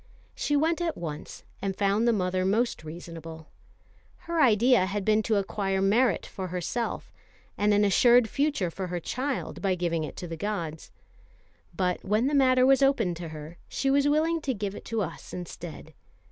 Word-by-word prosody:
She 290 - -1
went 320 +4 +1
at 335 -2 -1
once, 155 -3 -7 0.2
and 195 -1 -2
found 205 +4 +1
the - - +5
mother 185 -3 0
most 215 +1 0
reasonable. 165 0 -9 0.8
Her 335 -1 0
idea 235 -4 +4
had 200 0 -3
been 215 0 +3
to 220 0 0
acquire 195 -1 -1
merit 220 +6 +2
for 190 -1 -6
herself, 185 +7 -3 0.4
and 210 +1 +2
an 205 0 +4
assured 240 +4 +5
future 275 - 0
for 190 +2 -5
her 175 0 -3
child, 260 - -3
by 195 -2 +1
giving 170 -2 -1
it 150 - -6
to 175 - -6
the 165 - -5
gods; 165 -4 -4 0.9
but 180 -1 0
when 215 +5 +1
the 285 - 0
matter 255 -2 +5
was 270 +1 +5
opened 235 -10 +2
to 170 -1 -6
her, 155 +1 -9
she 270 - 0
was 280 +1 +3
willing 320 +2 +2
to 265 -4 -2
give 200 -1 -3
it - - -10
to 225 -2 -1
us 170 - -8
instead. 170 -3 -8
205 Hz, 180 wpm, -27 LUFS, 175-255 Hz, 0.9 s, the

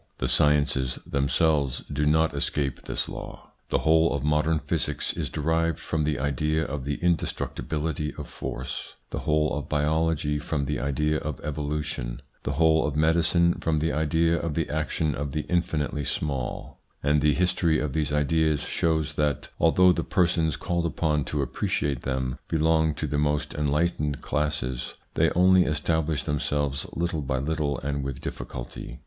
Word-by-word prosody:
The - - -1
sciences 70 -4 +2
themselves 70 0 +1
do 75 +1 +1
not 80 +1 +3
escape 70 -2 -2
this - - -2
law. - - -8 0.2
The - - +2
whole 80 +1 +5
of 70 - -3
modern 75 +2 +2
physics - - -1
is - - -3
derived 80 +1 0
from 80 -2 -1
the 75 -2 0
idea 75 +4 0
of 70 -2 -4
the 70 +1 -1
indestructibility 80 -2 -1
of - - -7
force, 65 0 -6 0.2
the - - -2
whole 75 0 +1
of 75 - -5
biology 75 0 +1
from 75 -1 -2
the - - -2
idea 75 +3 0
of 75 -2 -5
evolution, 75 -4 -3 0.2
the - - -2
whole 80 0 +4
of 75 - -3
medicine 85 +2 +3
from 80 -1 +1
the 80 +2 0
idea 80 +2 +2
of 80 -3 -3
the 80 -2 -1
action 75 0 0
of 70 0 -4
the 75 - 0
infinitely 75 -4 -1
small; 70 -2 -3 0.2
and 75 +1 +3
the 75 -1 +3
history 85 -1 +2
of 75 -3 -2
these 75 -1 0
ideas 75 +1 +2
shows 80 -2 0
that, 75 -3 -1
although 90 +3 +5
the 85 -2 0
persons 85 -3 +1
called 85 -2 -1
upon 75 -4 0
to 75 -2 -1
appreciate 70 +1 -1
them 65 -1 -2
belong 80 -1 +2
to 75 - -3
the 75 0 -1
most 75 0 0
enlightened 75 0 0
classes, 70 -5 -2 0.2
they - - +3
only 90 +1 +6
establish 75 0 0
themselves 75 -1 -1
little 85 -2 -1
by 65 -1 -1
little 70 0 -1
and 70 0 -2
with 70 -2 -4
difficulty. - - -7
75 Hz, 160 wpm, -26 LUFS, 70-80 Hz, 0.2 s, only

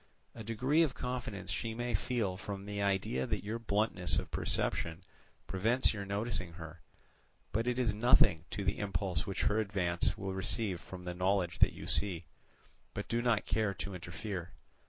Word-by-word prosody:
A 115 - -7
degree 125 +8 +2
of 145 -6 +2
confidence 125 -5 -4
she 115 -2 -2
may 120 0 -2
feel 110 -3 0
from 100 +1 -6
the 100 0 -3
idea 95 -10 +1
that - - -1
your 110 +3 -3
bluntness 105 -4 +2
of - - -2
perception 85 +2 0 0.4
prevents 115 +8 +2
your 100 -2 -4
noticing 100 -4 -2
her; 80 -1 -9 0.7
but 115 +3 0
it 125 0 +1
is 120 -4 +2
nothing 105 -6 +5
to 100 - -3
the - - 0
impulse 95 -3 -1
which 95 - -2
her 105 - +3
advance 95 -5 +1
will 95 -1 -3
receive 95 -1 -1
from 90 -1 -9
the 90 - -3
knowledge 90 -2 +1
that - - +6
you - - -8
see, 90 -5 +2 0.7
but - - -3
do 115 +1 +1
not 120 -3 +2
care 105 -1 +1
to 100 - -4
interfere. 90 +1 -5
100 Hz, 175 wpm, -33 LUFS, 90-115 Hz, 0.7 s, that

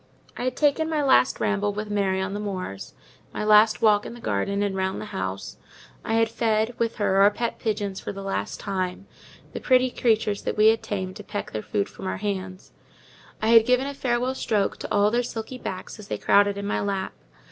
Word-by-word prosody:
I - - -4
had 255 0 -1
taken 300 +2 +2
my 305 -2 0
last 265 -1 +4
ramble 205 0 0
with 210 +1 -5
Mary 195 -2 +1
on 190 +1 -2
the 205 - -3
moors, 185 - -5 0.4
my - - -3
last 215 +2 +5
walk 210 -2 +5
in - - -8
the - - -11
garden, 200 - -1
and 200 -1 -1
round 190 0 -1
the - - -6
house; 95 +1 -4 0.5
I 225 - -1
had 225 0 +3
fed, 225 0 0
with 230 -1 0
her, 200 -2 +1
our 200 - +7
pet 230 +3 -3
pigeons 205 -3 -2
for - - -5
the 195 0 -7
last 195 0 -3
time—the 190 -1 -6
pretty 255 -1 +3
creatures 220 -4 +1
that - - -3
we 215 +1 +7
had 225 0 +2
tamed 190 -2 -4
to 210 - -9
peck 205 0 -5
their 110 - -3
food 100 -1 -1
from - - -8
our - - -2
hands: 190 -2 -5 0.7
I 220 - +2
had 230 -1 +8
given 250 +2 +2
a 280 - -4
farewell 250 -1 0
stroke 215 -6 0
to - - -7
all 205 +1 +3
their 240 +1 +2
silky 235 +1 -6
backs 190 +2 -6
as 210 - -10
they - - -3
crowded 200 0 +3
in 200 - -4
my 205 - -1
lap. 195 -2 -2
210 Hz, 215 wpm, -25 LUFS, 195-230 Hz, 0.7 s, had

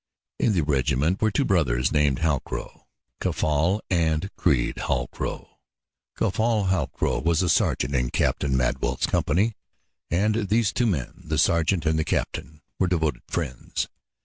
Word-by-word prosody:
In 110 - +2
the 90 - +2
regiment 70 +4 +1
were 110 - +4
two 100 - 0
brothers 65 -10 +2
named 75 -1 +2
Halcrow 75 -5 -2 0.3
Caffal 80 +7 +1
and 85 +1 +1
Creede 70 -9 +1
Halcrow. - - -3 0.6
Caffal 105 0 +1
Halcrow 95 -5 0
was 85 +2 +2
a 90 - +1
sergeant 70 -4 +1
in 60 -2 +1
Captain 70 -2 0
Madwell's 65 - 0
company, 100 +10 +1 0.6
and 105 +3 +1
these 110 0 +2
two 120 -1 +1
men, 75 - -2
the - - -1
sergeant 85 0 +2
and 80 0 +2
the - - +2
captain, 75 0 -3 0.2
were 95 - +3
devoted 80 -7 0
friends. 60 - -3
80 Hz, 140 wpm, -25 LUFS, 70-95 Hz, 0.6 s, were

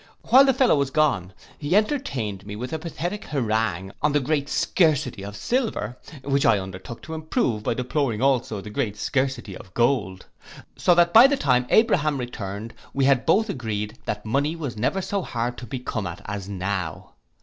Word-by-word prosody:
While 265 +2 +7
the 270 - +5
fellow 260 - +4
was 140 -1 +1
gone, 135 -12 +1 0.3
he 150 +5 0
entertained 170 - 0
me 105 +1 -7
with 125 +7 -5
a 160 - -2
pathetic 175 +5 -4
harangue 110 - -1
on 150 -1 +2
the 145 - +4
great 145 +1 -1
scarcity 145 - +1
of 100 +1 -7
silver, 220 - -1 0.3
which 140 0 +1
I - - +5
undertook 95 +3 -7
to 160 - -7
improve, 155 - -1
by 115 - -1
deploring 125 -2 -1
also 125 -5 +1
the 105 - -9
great 105 -4 -2
scarcity 130 -6 -1
of 90 - -13
gold; 115 -7 +1 0.5
so 175 - +3
that 170 0 +4
by 235 +4 +10
the 285 0 +1
time 125 - +2
Abraham 155 -10 +3
returned, 115 -3 -5 0.2
we 135 -1 +2
had 135 -2 +3
both 210 +7 +4
agreed 110 - -4
that 105 0 -4
money 140 +8 0
was 145 -8 -5
never 130 - -1
so 200 +1 -1
hard 120 -5 -3
to 120 - -9
be 130 - -4
come 115 -5 -4
at 85 0 -7
as 100 -1 -5
now. 95 -4 -4
125 Hz, 185 wpm, -24 LUFS, 105-155 Hz, 0.5 s, by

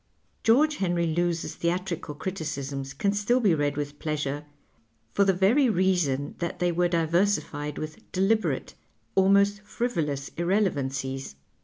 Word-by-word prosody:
George 290 +7 +4
Henry 175 -2 +1
Lewes's 170 +1 -1
theatrical 170 -3 -2
criticisms 140 -6 -4
can 200 +9 0
still 210 +5 +2
be 205 -8 +3
read 145 -2 0
with 145 0 -4
pleasure 150 -2 -2 0.7
for 200 - +4
the 195 - +4
very 215 +9 +3
reason 175 -8 +1
that 170 -1 -3
they 175 0 +1
were 175 +1 +2
diversified 165 -3 0
with 155 0 -7
deliberate, 200 +4 +1 0.4
almost 200 +2 +4
frivolous 165 - -2
irrelevancies. 135 - -1
175 Hz, 125 wpm, -27 LUFS, 145-200 Hz, 0.7 s, George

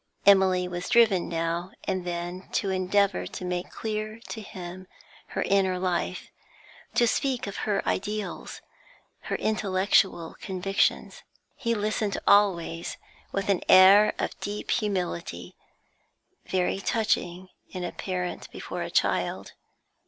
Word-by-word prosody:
Emily 190 -2 +5
was 175 0 -5
driven 220 -7 +4
now 170 +2 -2
and 185 -1 -2
then 175 +1 -5
to 195 - 0
endeavour 190 +1 +1
to 185 - -7
make 180 0 -3
clear 215 0 -4
to 220 - -5
him 185 -2 -9 0.4
her - - -2
inner 190 -2 +2
life, 180 -1 -2 0.6
to 240 - +5
speak 260 +2 0
of 200 - -6
her 200 - 0
ideals, 210 +1 -3 0.6
her - - -2
intellectual 190 -4 +1
convictions. 195 0 0 0.3
He 235 -3 -1
listened 210 -1 -1
always 170 -5 +2 0.3
with 195 0 -2
an 195 -3 +2
air 200 +3 +8
of - - -3
deep 205 +1 -4
humility, 180 - -2 0.9
very 185 +1 0
touching 185 -4 -1 0.2
in 185 -2 -5
a 175 - -3
parent 180 -2 -4
before - - -6
a - - -3
child. - - 0
190 Hz, 125 wpm, -27 LUFS, 180-205 Hz, 0.9 s, air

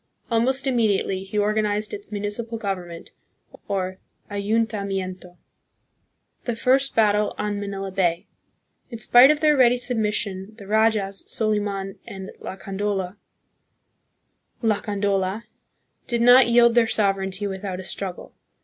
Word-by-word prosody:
Almost 260 +4 +2
immediately 215 -7 +1
he 195 +2 -6
organized 210 0 0
its 405 - -7
municipal 210 +3 -4
government, 180 -5 -5 0.6
or 185 -1 -2 0.3
ayuntamiento. 200 -4 -2 1.1
The 240 - -1
First 265 +4 +2
Battle 210 -1 +2
on 210 -1 -2
Manila 195 -1 -5
Bay. 180 -3 0 0.6
In 235 - -7
spite 245 +4 +7
of 300 0 +2
their 305 -1 +4
ready 250 -2 +5
submission, 215 -4 -2
the 200 - -11
rajas, 210 -2 +1
Soliman 205 -3 -2
and 190 -1 -8
Lacandola, 195 -1 -3 2.9
did 235 -2 0
not 245 +1 +8
yield 235 0 +5
their 235 -1 +4
sovereignty 195 -2 0
without 190 -1 -4
a - - -6
struggle. 185 -1 -6
210 Hz, 110 wpm, -23 LUFS, 195-230 Hz, 2.9 s, not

